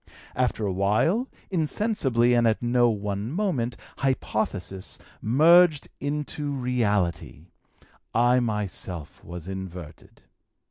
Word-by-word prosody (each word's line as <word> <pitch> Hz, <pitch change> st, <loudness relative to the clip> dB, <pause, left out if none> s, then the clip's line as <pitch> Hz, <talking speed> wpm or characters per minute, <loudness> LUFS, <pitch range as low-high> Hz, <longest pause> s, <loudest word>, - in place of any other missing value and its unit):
After 125 Hz, -4 st, 0 dB
a 95 Hz, -, -1 dB
while, 115 Hz, -, +1 dB, 0.2 s
insensibly 150 Hz, -, +1 dB
and 120 Hz, -1 st, +4 dB
at 110 Hz, +1 st, 0 dB
no 120 Hz, 0 st, +3 dB
one 105 Hz, 0 st, -3 dB
moment, 150 Hz, -, -1 dB, 0.2 s
hypothesis 105 Hz, -8 st, -2 dB, 0.2 s
merged 155 Hz, +6 st, +5 dB
into 145 Hz, 0 st, -3 dB
reality: 105 Hz, -, -1 dB, 0.6 s
I 120 Hz, +2 st, +4 dB
myself 100 Hz, -8 st, -4 dB
was 85 Hz, 0 st, -8 dB
inverted. 90 Hz, -4 st, -8 dB
120 Hz, 95 wpm, -26 LUFS, 100-140 Hz, 0.6 s, merged